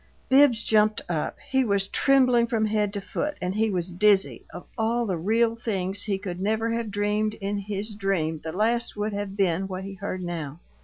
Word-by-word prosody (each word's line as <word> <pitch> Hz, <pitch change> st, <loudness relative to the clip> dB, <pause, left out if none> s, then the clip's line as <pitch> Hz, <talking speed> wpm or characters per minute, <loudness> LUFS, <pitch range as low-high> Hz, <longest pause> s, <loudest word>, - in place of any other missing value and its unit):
Bibbs 265 Hz, -4 st, +5 dB
jumped 215 Hz, 0 st, +3 dB
up. 160 Hz, -3 st, -2 dB
He 265 Hz, 0 st, +3 dB
was 200 Hz, -4 st, +1 dB
trembling 255 Hz, -4 st, +3 dB
from 225 Hz, -2 st, +1 dB
head 210 Hz, -1 st, 0 dB
to 200 Hz, -, -2 dB
foot 295 Hz, +9 st, -3 dB
and 180 Hz, +1 st, -2 dB
he 220 Hz, +2 st, +1 dB
was 180 Hz, -2 st, -2 dB
dizzy 200 Hz, +1 st, +3 dB
of 175 Hz, -, -9 dB
all 235 Hz, +1 st, 0 dB
the 190 Hz, -4 st, -1 dB
real 225 Hz, +7 st, +1 dB
things 200 Hz, -4 st, -2 dB
he 200 Hz, -2 st, 0 dB
could 185 Hz, -2 st, -6 dB
never 220 Hz, +3 st, 0 dB
have 230 Hz, -1 st, -2 dB
dreamed 210 Hz, +1 st, 0 dB
in 200 Hz, 0 st, -3 dB
his 205 Hz, +2 st, -3 dB
dream 180 Hz, -6 st, -1 dB
the 160 Hz, -, -4 dB
last 225 Hz, +5 st, 0 dB
would 210 Hz, +1 st, -2 dB
have 200 Hz, -1 st, -4 dB
been 190 Hz, -1 st, +1 dB
what 185 Hz, 0 st, -5 dB
he 195 Hz, 0 st, -7 dB
heard 190 Hz, -1 st, -5 dB
now. 165 Hz, -4 st, -5 dB
205 Hz, 200 wpm, -25 LUFS, 190-225 Hz, -, Bibbs